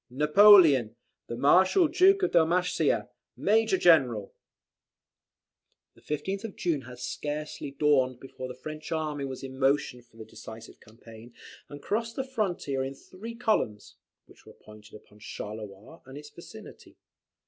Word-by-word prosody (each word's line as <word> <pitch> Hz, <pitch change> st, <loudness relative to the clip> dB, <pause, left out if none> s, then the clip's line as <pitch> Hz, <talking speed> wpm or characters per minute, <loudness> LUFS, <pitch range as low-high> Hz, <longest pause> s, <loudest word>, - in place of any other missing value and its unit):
"NAPOLEON." 150 Hz, -, +5 dB, 0.3 s
"THE 120 Hz, -, -5 dB
MARSHAL 190 Hz, -, +4 dB
DUKE 385 Hz, +4 st, +4 dB
OF -, -, +1 dB
DALMATIA. 175 Hz, +2 st, +1 dB, 0.3 s
MAJOR 220 Hz, -1 st, +2 dB
GENERAL." 130 Hz, -, +3 dB, 1.6 s
The -, -, -23 dB
15th 190 Hz, +8 st, -4 dB
of 225 Hz, -3 st, -7 dB
June 165 Hz, -6 st, -2 dB
had 125 Hz, 0 st, -12 dB
scarcely 150 Hz, +4 st, -5 dB
dawned 135 Hz, -3 st, +1 dB
before 130 Hz, -1 st, -9 dB
the 125 Hz, -, -9 dB
French 155 Hz, +4 st, -9 dB
army 155 Hz, -3 st, -3 dB
was 130 Hz, -1 st, -7 dB
in 130 Hz, 0 st, -9 dB
motion 135 Hz, -2 st, 0 dB
for 115 Hz, -1 st, -25 dB
the 110 Hz, -, -10 dB
decisive 110 Hz, +1 st, -12 dB
campaign, 115 Hz, +1 st, -16 dB, 0.3 s
and 145 Hz, 0 st, -11 dB
crossed 230 Hz, +2 st, -3 dB
the 265 Hz, -, -2 dB
frontier 190 Hz, -, -3 dB
in 135 Hz, +1 st, -6 dB
three 215 Hz, +10 st, -11 dB
columns, 215 Hz, -, -2 dB, 0.3 s
which -, -, -21 dB
were -, -, -15 dB
pointed 105 Hz, -1 st, -16 dB
upon 105 Hz, 0 st, -17 dB
Charleroi 105 Hz, +7 st, -9 dB
and 135 Hz, +1 st, -10 dB
its 150 Hz, 0 st, -12 dB
vicinity. 220 Hz, +5 st, -14 dB
145 Hz, 140 wpm, -27 LUFS, 125-185 Hz, 1.6 s, NAPOLEON